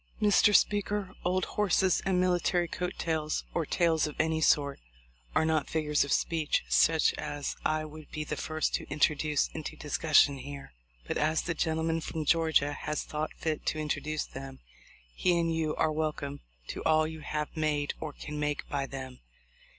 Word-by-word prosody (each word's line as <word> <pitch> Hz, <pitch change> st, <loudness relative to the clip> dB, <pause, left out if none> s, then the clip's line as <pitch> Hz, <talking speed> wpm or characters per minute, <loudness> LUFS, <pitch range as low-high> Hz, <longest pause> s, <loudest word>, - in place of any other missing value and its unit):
"Mr. 210 Hz, 0 st, +5 dB
Speaker, 205 Hz, -1 st, +2 dB
old 185 Hz, 0 st, +1 dB
horses 190 Hz, -2 st, +2 dB
and 185 Hz, -2 st, +2 dB
military 175 Hz, -1 st, +2 dB
coat 180 Hz, +1 st, -3 dB
tails, 155 Hz, -2 st, -1 dB
or 165 Hz, -4 st, -1 dB
tails 165 Hz, -3 st, +2 dB
of 150 Hz, -, -7 dB
any 160 Hz, 0 st, +1 dB
sort, 145 Hz, -, +3 dB, 0.6 s
are 160 Hz, -, +4 dB
not 155 Hz, -3 st, +1 dB
figures 150 Hz, -2 st, +1 dB
of 140 Hz, -, -5 dB
speech 160 Hz, -2 st, +1 dB
such 160 Hz, -1 st, +4 dB
as 145 Hz, -1 st, -3 dB
I 155 Hz, 0 st, 0 dB
would 155 Hz, 0 st, -11 dB
be 155 Hz, -, -4 dB
the 150 Hz, -, -4 dB
first 155 Hz, +1 st, -2 dB
to -, -, -2 dB
introduce 150 Hz, 0 st, +1 dB
into 155 Hz, -2 st, -5 dB
discussion 145 Hz, -2 st, +3 dB
here; 140 Hz, -, -8 dB, 0.3 s
but -, -, -2 dB
as 155 Hz, +1 st, +1 dB
the 170 Hz, -, -1 dB
gentleman 160 Hz, 0 st, 0 dB
from 155 Hz, -1 st, -4 dB
Georgia 160 Hz, -2 st, +3 dB
has 150 Hz, +1 st, -3 dB
thought 155 Hz, +1 st, -4 dB
fit 155 Hz, -2 st, -2 dB
to -, -, 0 dB
introduce 155 Hz, 0 st, -2 dB
them, 135 Hz, 0 st, -9 dB, 0.6 s
he 175 Hz, -, +2 dB
and 165 Hz, -1 st, +1 dB
you 160 Hz, -1 st, -1 dB
are 160 Hz, -, +2 dB
wel 155 Hz, 0 st, 0 dB
come 140 Hz, -1 st, -6 dB, 0.3 s
to -, -, -5 dB
all 155 Hz, 0 st, +4 dB
you 160 Hz, 0 st, -6 dB
have 150 Hz, +1 st, -4 dB
made 150 Hz, -2 st, 0 dB
or 155 Hz, -, -4 dB
can 150 Hz, +1 st, -7 dB
make 150 Hz, -1 st, -2 dB
by 140 Hz, -1 st, -1 dB
them. 130 Hz, -2 st, -7 dB
155 Hz, 175 wpm, -30 LUFS, 150-165 Hz, 0.6 s, Mr